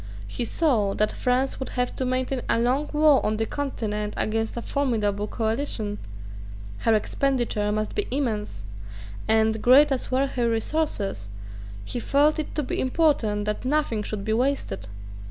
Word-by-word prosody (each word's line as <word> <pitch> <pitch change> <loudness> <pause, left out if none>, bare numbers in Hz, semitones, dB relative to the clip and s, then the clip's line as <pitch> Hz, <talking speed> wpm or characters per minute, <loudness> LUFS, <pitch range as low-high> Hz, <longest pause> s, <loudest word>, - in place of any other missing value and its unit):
He 235 - -3
saw 225 -11 +1
that 215 - +2
France 255 +2 0
would 265 - -4
have 250 0 0
to 260 - -1
maintain 255 0 -1
a - - +3
long 255 +6 +1
war 300 -2 +5
on 215 0 0
the 225 - 0
Continent 215 -7 -3
against 225 +1 -1
a 235 - -3
formidable 210 -7 0
coalition: 220 -2 -2 0.8
her 225 - +3
expenditure 235 -2 0
must 215 0 -2
be 415 - -1
immense; 215 - -2 0.6
and, 220 0 +3
great 275 +4 +6
as 265 - -1
were 265 +2 +2
her 245 -3 0
resources, 225 - -1 0.6
he 245 - -3
felt 290 +5 +3
it 305 - -4
to 300 - 0
be - - -3
important 255 -8 +1
that 210 0 -2
nothing 265 -5 0
should 210 -1 -4
be 220 - 0
wasted. 250 - -1
240 Hz, 155 wpm, -25 LUFS, 215-275 Hz, 0.8 s, great